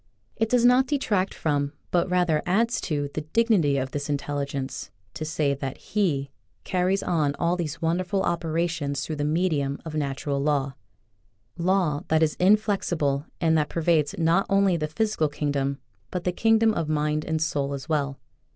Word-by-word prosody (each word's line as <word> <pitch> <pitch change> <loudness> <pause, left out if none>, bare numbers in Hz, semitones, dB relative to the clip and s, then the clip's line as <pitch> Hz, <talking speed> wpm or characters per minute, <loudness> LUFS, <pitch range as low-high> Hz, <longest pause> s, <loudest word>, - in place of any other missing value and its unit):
It 225 -1 0
does 245 0 +3
not 250 +2 +5
detract 210 -10 0
from, 145 -2 -1 0.2
but 175 +1 +2
rather 175 -4 +2
adds 230 +6 +2
to, 145 -3 -2
the 155 - -2
dignity 165 -4 +2
of 130 0 -2
this 145 0 -4
Intelligence 140 -1 -3 0.2
to - - -5
say 155 -2 0
that 135 -1 -5
He 145 -10 -1 0.3
carries 185 +1 0
on 150 -5 +1
all 170 +1 +1
these 165 -2 -4
wonderful 185 +4 0
operations 165 -4 -1
through 155 - -4
the 145 - -1
medium 150 -3 0
of 160 - -6
Natural 140 -1 -2
Law 140 -2 0 0.5
— 105 - -42
Law 175 -7 +2
that 160 0 +3
is 155 - +2
inflexible 180 -8 +2
and 160 -2 +3
that 150 - -1
pervades 160 -3 +1
not 170 +3 +2
only 195 -2 +3
the 155 -2 -1
physical 160 -1 0
kingdom, 140 -2 -1 0.3
but 180 - -4
the 180 - +1
kingdoms 225 +3 +3
of 165 -2 -1
mind 150 0 0
and 160 0 -1
soul 140 -3 -1
as 135 -2 -8
well. 140 -3 -1
155 Hz, 170 wpm, -25 LUFS, 145-180 Hz, 0.5 s, not